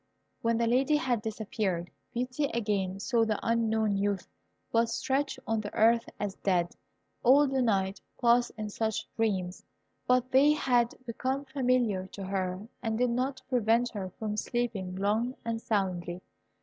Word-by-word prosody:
When 230 0 +2
the 235 - +2
Lady 260 +6 +3
had 250 -6 +1
disappeared, 205 -5 -2 0.2
Beauty 250 +4 -1
again 200 -4 -1
saw 230 +2 +2
the 220 -2 0
unknown 220 -3 +1
youth, 200 -1 -1 0.4
but 230 0 +3
stretched 275 +1 -1
on 225 -1 0
the 205 - -6
earth 230 +1 +4
as 205 -2 -2
dead. 175 -3 0 0.5
All 280 +4 +6
the 265 -1 +1
night 195 -4 +1 0.2
passed 240 0 +4
in 215 -1 -4
such 220 0 -2
dreams; 190 -5 -1 0.4
but 255 0 +2
they 280 +3 +6
had 245 -5 +2
become 260 +4 -2
familiar 250 -8 +1
to 195 - -6
her, 190 +1 -2
and 225 -2 -1
did 250 0 +2
not 260 +2 -1
prevent 240 -1 +2
her 195 -4 -4
from 210 -1 -3
sleeping 215 -6 -2
long 215 +6 0
and 230 -1 -2
soundly. 185 -5 -1
225 Hz, 150 wpm, -30 LUFS, 200-250 Hz, 0.5 s, All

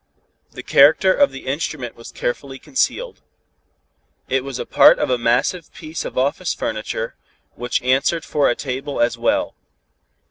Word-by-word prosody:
The - - -8
character 155 +7 +5
of 285 +5 +4
the 135 - -10
instrument 135 -2 -3
was 115 - -11
carefully 135 +2 -4
concealed. 460 - -2 1.1
It 130 0 +1
was 135 -2 -5
a - - -4
part - - +6
of - - -1
a 125 - +2
massive 125 +8 0
piece 155 +1 -6
of - - -7
office 140 +7 0
furniture, 110 +1 -4 0.4
which 120 0 -2
answered 135 +6 +1
for 145 -2 +2
a 120 - +1
table 135 0 -4
as 120 0 +1
well. - - 0
135 Hz, 150 wpm, -20 LUFS, 125-155 Hz, 1.1 s, part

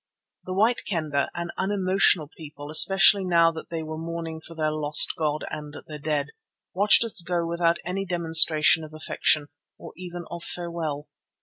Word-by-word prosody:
The 185 - -5
White 225 +5 +1
Kendah, 155 -7 -2
an 170 0 -5
unemotional 190 -4 +1
people 150 -2 -11
especially 195 +4 +5
now 170 -2 +2
when 160 - -9
they 165 -1 -5
were 155 0 -7
mourning 165 -1 -7
for 165 - -13
their 155 -1 -1
lost 150 -1 +3
god 155 -1 -3
and 150 0 -8
their 150 -1 -10
dead, 150 -1 -2 0.4
watched 205 +5 +5
us 225 -5 +4
go 170 0 -3
without 170 0 0
any 185 +2 -3
demonstration 160 -3 +3
of 155 0 -11
affection, 155 -1 0 0.3
or - - -12
even 175 -1 -9
of 170 0 -7
farewell. 165 -5 -6
165 Hz, 165 wpm, -24 LUFS, 155-175 Hz, 0.4 s, especially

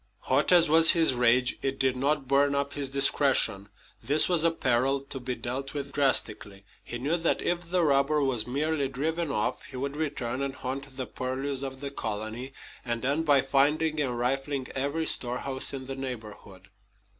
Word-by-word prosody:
Hot - - +1
as 175 -2 +6
was 160 +2 +7
his 165 -5 +4
rage, 125 +1 +2
it 135 0 -2
did 130 -1 +1
not 140 +1 0
burn 140 +1 +3
up 140 0 -2
his 140 -2 -4
discretion. 135 -7 +2 0.3
This 145 +7 +2
was 175 -3 +2
a 165 - +5
peril 135 -3 0
to 135 0 -6
be 125 0 -4
dealt 135 +4 -5
with 140 -1 -5
drastically. 105 -8 0 0.2
He 120 - -6
knew 145 +8 -1
that, 165 0 0
if 175 -1 -2
the 180 -1 +1
robber 140 0 +2
was 125 -5 -1
merely 145 +2 -1
driven 160 +5 -2
off, 105 -6 -2
he - - -8
would 140 +2 -3
return 140 -5 -3
and 135 -1 -3
haunt 135 +1 -6
the 130 - -3
purlieus 130 +2 -3
of 135 -1 -5
the 140 -1 -5
colony, 110 +2 -5 0.3
and 120 -1 -3
end 150 +4 0
by 140 -2 +6
finding 150 +3 +1
and 125 -4 -1
rifling 135 +2 -2
every 140 +4 -2
storehouse 130 0 -1
in 135 -1 -6
the 135 - -5
neighborhood. 110 -7 -8
135 Hz, 180 wpm, -27 LUFS, 125-145 Hz, 0.3 s, was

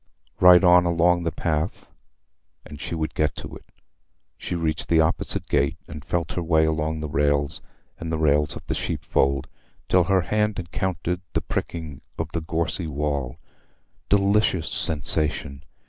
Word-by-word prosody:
Right 90 0 +8
on 90 0 +6
along 85 0 +2
the 85 - 0
path, 80 +2 -2 0.8
and 75 0 -10
she - - -4
would 80 -1 -3
get 75 -1 0
to - - -8
it. - - -13 0.7
She - - -5
reached 80 -2 -2
the 80 - +4
opposite 80 +1 0
gate, 70 +1 +1
and 75 -1 -9
felt 85 +1 -2
her 90 - -2
way 80 -1 +3
along 80 0 -1
its 75 -2 -6
rails 70 -1 +1 0.4
and 80 0 -5
the 80 - 0
rails 75 -2 +2
of - - -9
the - - -2
sheep - - -3
fold, 70 0 +1 0.4
till 90 -1 +3
her 95 0 +3
hand 105 +2 0
encountered 90 0 -3
the - - 0
pricking 80 -5 -5 0.2
of 80 0 -4
the 85 - -2
gorsy 80 +1 -2
wall. 70 -2 -2 0.7
Delicious 100 -3 +2
sensation! 75 -2 +1
80 Hz, 160 wpm, -24 LUFS, 75-90 Hz, 0.8 s, Right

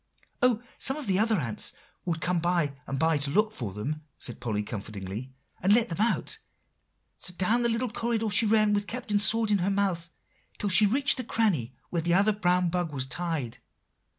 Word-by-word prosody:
"Oh! 245 -2 +3 0.2
some 270 +2 +3
of 300 - -5
the 195 -2 +1
other 220 +1 +3
ants 115 -9 -1 0.3
would 165 -3 -2
come 175 +2 0
by 170 -4 0
and 135 - -3
by, 160 +1 +2
to 140 0 +1
look 215 +8 +2
for 120 - -5
them," 140 +10 -4 0.2
said 120 - -2
Polly 110 -4 -2
comfortingly, 105 +2 -6 0.3
"and 195 +3 +4
let 235 0 +2
them 170 +4 -3
out. 230 - +1 0.8
So 180 - -3
down 215 +7 +2
the 235 - +2
long 230 +1 -1
corridor 225 -2 -1
she 215 +2 +4
ran 215 -1 +3
with 205 -1 -1
the - - -7
Captain's 215 -5 +1
sword 225 -1 +3
in 205 - +3
her 180 +2 0
mouth, 190 -4 -1 0.5
till 205 - -1
she 205 +4 +7
reached 270 +5 +2
the 255 - -3
cranny 190 - 0 0.2
where 170 - 0
the 170 +1 +1
other 205 +3 +4
brown 180 -3 +1
bug 175 -2 -2
was 130 -3 -2
tied. 150 -4 -3
180 Hz, 205 wpm, -27 LUFS, 150-220 Hz, 0.8 s, she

